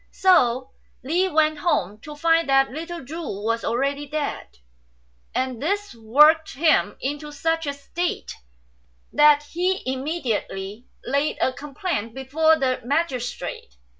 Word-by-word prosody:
So 260 -9 +3 0.3
Li 350 +8 +1
went 310 -2 +2
home, 210 - 0
to 300 +5 -10
find 330 0 +2
that 270 -1 +4
little 330 +1 -6
Chu 320 +6 -6
was 230 -4 -2
already 275 +5 -1
dead; 300 - -4 0.8
and 255 -3 -2
this 405 +3 -1
worked 295 +8 +4
him 290 -9 +2
into 295 +2 -4
such 325 +2 -1
a 285 - -1
state 330 +5 -4 0.8
that 295 0 +6
he 365 +3 0
immediately 255 - -3 0.2
laid 280 +4 0
a 260 - +1
complaint 280 - -4
before 310 +5 +3
the 260 -3 0
magistrate. 255 - -3
285 Hz, 125 wpm, -23 LUFS, 255-320 Hz, 0.8 s, that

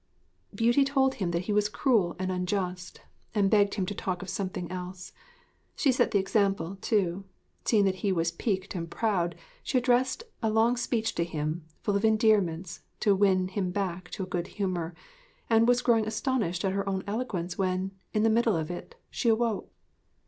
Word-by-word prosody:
Beauty 240 +4 +4
told 270 -1 +2
him 190 -7 -2
that 170 +1 -1
he 210 - -1
was 210 0 +2
cruel 210 -7 +2
and 185 0 -2
unjust, 180 -1 -3 0.3
and 200 -2 +3
begged 205 -2 +4
him 195 -3 0
to 205 - -3
talk 185 -2 -3
of 190 - -8
something 185 -2 -3
else. 180 0 -7 0.6
She 275 - +3
set 255 - +2
the 205 - +2
example, 195 -2 0
too. 195 -3 0 0.4
Seeing 210 -3 +4
that 190 -1 +1
he 200 - +1
was 170 -2 +1
piqued 190 +2 -2
and 170 -3 -4
proud, 180 -4 0 0.3
she 260 - 0
addressed 250 - +2 0.2
a 225 - +1
long 225 +3 +3
speech 235 -2 -1
to 170 - 0
him, 155 0 -3 0.2
full 205 - +1
of 200 - 0
endearments, 200 -6 +2 0.2
to 205 - +4
win 190 -2 +3
him 190 -1 -1
back 180 -1 -3
to 195 - -3
a - - -3
good 180 -1 -3
humour, 180 -4 -2 0.6
and 225 +1 +5
was 245 0 +3
growing 225 -3 +3
astonished 220 -6 -1
at 190 - +1
her 195 0 -1
own 190 -1 -2
eloquence 200 -5 -3
when, 185 0 0 0.2
in 215 - +1
the 225 - +5
middle 230 -2 +3
of 160 0 -2
it, 325 - -8 0.2
she 235 - 0
awoke. 225 -1 0
195 Hz, 185 wpm, -28 LUFS, 180-220 Hz, 0.6 s, and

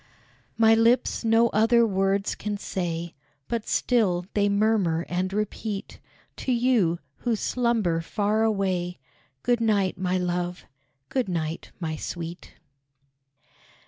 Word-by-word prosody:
My 225 0 +6
lips 230 +3 +3
no 225 +1 +4
other 230 +2 +4
words 195 -1 +1
can 210 0 -4
say, 170 -3 -3 0.3
But 230 -2 -3
still 190 -8 +1
they 205 -1 +2
murmur 200 -5 +2
and 185 +2 -1
repeat 210 0 -4 0.4
To 260 - -2
you, 235 -9 +2 0.2
who 240 -2 0
slumber 220 -8 0
far 210 +5 0
away, 190 -5 0 0.5
Good 240 -1 +2
night, 200 -5 +1
my 185 0 0
love! 180 0 -2 0.4
good 255 -6 -1
night, 165 -2 -3
my 160 -3 -3
sweet! 170 +1 -7
200 Hz, 115 wpm, -26 LUFS, 175-225 Hz, 0.5 s, My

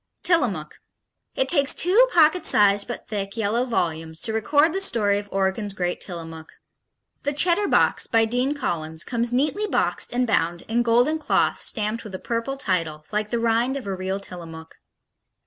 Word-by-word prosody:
Tillamook 340 -2 0 0.6
It - - 0
takes 280 -4 +2
two 415 +9 +4
pocket 330 0 +4
sized, 200 -1 +3
but 240 - -7
thick, 200 0 -4
yellow 225 +3 0
volumes 160 -8 -2
to 225 -2 -1
record 290 +8 +2
the 385 - -1
story 205 - +1
of 205 0 -10
Oregon's 195 +1 -1
great 180 -2 -2
Tillamook. 165 -3 -8 0.7
The 285 - -2
Cheddar 350 +7 +2
Box, - - +2
by 225 -2 +3
Dean 250 +5 0
Collins, 160 - -3
comes 235 -1 -1
neatly 300 +12 0
boxed - - 0
and 250 +1 +1
bound 170 -6 0
in 230 +2 0
golden 245 +7 +2
cloth - - +1
stamped 215 0 -1
with 210 -4 -8
a - - -3
purple 235 +6 -3
title, 165 - -2
like 210 0 -2
the 235 - -1
rind 235 +3 +1
of 265 - -7
a 195 - -3
real 190 +1 -3
Tillamook. 165 -4 -10
225 Hz, 170 wpm, -23 LUFS, 190-270 Hz, 0.7 s, two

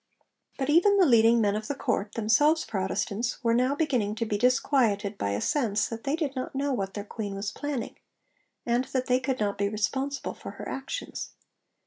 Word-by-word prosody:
But 265 - -1
even 400 +6 +5
the 380 - +6
leading 230 -3 +5
men 205 -1 +2
of 215 0 -4
the 285 - -2
Court, 210 -5 -1
themselves 290 +9 +3
Protestants, 200 +4 -2
were 230 -1 +3
now 255 +4 +2
beginning 250 -9 0
to 230 - -1
be 215 - -1
disquieted 225 -3 +2
by 100 - -2
a 100 +1 -1
sense 225 -8 +1
that 230 0 -7
they 280 +2 +1
did 300 -4 -2
not 255 +1 -4
know 280 0 0
what 195 -5 -3
their 205 - -4
queen 205 -2 -5
was 200 +1 -3
planning, 290 -5 -4 0.7
and 240 +2 +1
that 255 -1 -2
they 250 0 +2
could 260 0 -2
not 200 -1 -1
be 200 0 +1
responsible 265 +6 -2
for - - -9
her - - -8
actions. 270 - -5
235 Hz, 195 wpm, -27 LUFS, 210-275 Hz, 0.7 s, the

